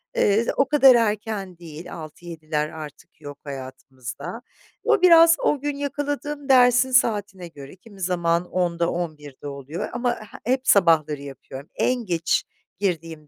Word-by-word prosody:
Eee, 210 +3 +2
o 275 - +3
kadar 270 -4 +7
erken 210 -5 -1
değil, 165 -1 -10
6-7'ler 155 -1 -5
artık 155 0 -11
yok 145 -1 -9
hayatımızda. 130 - -8 0.4
O 445 -4 +2
biraz 335 -2 +7
o 290 - 0
gün 290 0 -3
yakaladığım 290 0 -4
dersin 250 0 +5
saatine 205 -7 +1
göre 140 -3 -12
kimi 195 0 -16
zaman 170 -1 0
10.00'da 170 -2 0
11.00'de 150 -5 -6
oluyor 140 +3 -6
ama 245 0 0
he 215 +2 -7
hep 260 -1 -3
sabahları 160 -6 +3
yapıyorum. 140 0 -10
En 250 -2 0
geç 170 -3 0 0.4
girdiğim 165 -5 -3
180 Hz, 135 wpm, -23 LUFS, 155-245 Hz, 0.4 s, kadar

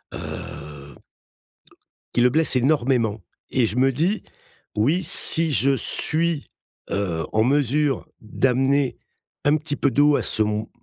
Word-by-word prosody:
heu 70 -1 -8 1.2
qui 120 - +2
le 125 - +5
blesse 155 +1 +1
énormément 120 -5 +1 0.3
et 130 -3 +3
je 110 - -3
me 135 +1 +4
dis: 170 - -1 0.5
«Oui, 150 - +2
si 165 -2 +2
je 135 0 +3
suis, 160 +3 0 0.4
heu, 85 -6 -2
en 110 0 +3
mesure 140 +1 +1
d'amener 135 +4 +1 0.5
un 145 +1 +3
petit 150 -1 -4
peu 140 - +1
d'eau 145 +4 +4
à - - 0
son 105 0 -1
135 Hz, 125 wpm, -23 LUFS, 110-150 Hz, 1.2 s, le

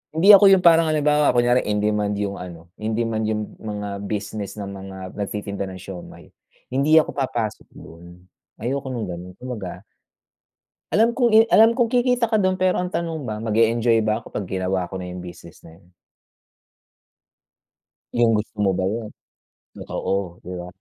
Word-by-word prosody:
hindi 185 +6 +4
ako 200 0 +9
'yung 190 -2 +5
parang 165 -1 +6
halimbawa 150 -3 +2
kunyari 120 +1 +3
in 105 0 0
demand 105 -1 0
'yung 100 -1 -3
ano, 85 -2 -10
in 110 0 -2
demand 110 -2 -1
'yung 110 -1 -1 0.2
mga 105 -2 -5
business 105 -1 -4
ng 100 -2 -6
mga 95 -1 -9 0.2
nagtitinda 100 -1 -4
ng 95 - -8
siomai, 90 -1 -11 0.4
hindi 140 +4 +3
ako 160 - +4
papasok 120 -6 -3
do'n 85 +2 -14 0.4
ayoko 130 +4 -3
ng 115 -5 -4
gano'n, 90 +1 -7
kumbaga 105 -8 -6 1.1
Alam 230 +2 +3
kong 245 -3 +3
i 220 - +7
alam 225 +1 +6
kong 240 -2 +3
kikita 245 0 +2
ka 220 - 0
do'n 185 -2 +1
pero 185 -1 +2
ang 180 0 -4
tanong 165 -3 -3
ba 110 -3 -4
mag-e-enjoy 115 +1 +2
ba 110 0 0
ako, 115 - -15
kapag 95 -2 -3
ginawa 95 -1 -1
ko 95 - -5
na 90 - -6
'yung 90 0 -7
business 85 -1 -12
na 80 +2 -15
'yun? 90 -1 -26 2.2
'Yung 120 -1 +3
gusto 105 0 -5
mo 95 - +3
ba 95 - 0
'yun? 110 +2 -3 0.9
Oo, 95 -3 -3
'di 90 - -8
ba? 90 - -7
110 Hz, 170 wpm, -22 LUFS, 95-150 Hz, 2.2 s, ako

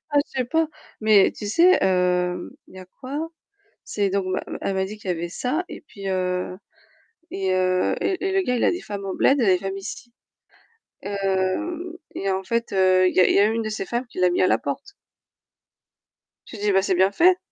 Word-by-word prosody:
Ah 290 - +3
je - - -30
sais - - +1
pas, 320 +5 +1 0.3
mais 215 -3 +5
tu 210 - -7
sais, 350 - +5
heu 180 -1 0
il - - -17
y - - -10
a 185 - -9 0.2
quoi? 290 +5 -4 0.6
C'est 200 -2 -1
donc 195 -1 -1
ma 185 0 -1
ma - - -5
elle 195 - -2
m'a 190 0 0
dit 210 +2 -7
qu'il 200 - -9
y 180 - +2
avait 170 +1 -4
ça 275 - -2
et - - -9
puis, 200 -8 -8
heu 180 -1 -2 0.7
et 190 -1 -1
heu 185 0 +1
et 380 0 -1
et - - -2
le 385 0 +2
gars 250 -7 0
il - - +1
a - - +4
des 355 - -4
femmes 200 -1 -6
en 190 - -3
bled, 275 - +4
il 240 - +2
a - - +1
des 185 -1 +4
femmes 195 +1 -4
ici. 230 +4 -8 0.9
Heu 200 - -2 0.2
et 195 0 -2
en 190 0 -1
fait, 235 +3 -1
il 185 -1 +4
y - - +4
a - - +7
il - - +2
y - - +5
a 205 - +5
une 225 +1 0
de 215 - -3
ces 215 - -3
femmes 240 +4 -2
qui 235 - -12
l'a 180 -1 +4
mis 180 - +1
à - - +5
la - - +3
porte. 145 - -5 1.5
Je 225 - -10
dis: 205 0 +1
«C'est 190 -2 0
bien 190 +2 +3
fait». 360 - +4
195 Hz, 235 wpm, -23 LUFS, 185-250 Hz, 1.5 s, a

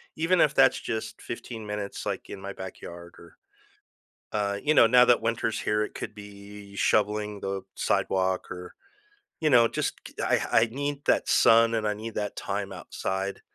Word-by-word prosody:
even 170 +3 +2
if 150 - +4
that's - - +5
just 110 -1 -5
15 115 -2 -7
minutes, 105 -1 -5
like, - - -4
in 95 - -8
my 100 0 -6
backyard 85 -2 -9
or 85 -1 -16 0.9
uh, 100 -1 -1
you 155 +1 +3
know, 115 - +8
now 125 +1 +6
that 120 -2 +4
winter's 115 0 -1
here, 105 0 0
it - - -7
could 110 - -6
be 100 -1 -12
shoveling 105 0 +1
the 95 -1 -3
sidewalk 95 -1 0
or, 90 0 -8 0.7
you 155 -1 +2
know, 120 -3 +6
just - - -2
c - - -13
I - - +2
I 110 - +6
need 145 +2 -4
that - - +2
sun, 115 0 +5
and 110 -1 0
I 105 - 0
need 110 +1 -7
that 105 -1 -3
time 100 0 -3
outside. 95 +1 -4
105 Hz, 175 wpm, -27 LUFS, 100-115 Hz, 0.9 s, know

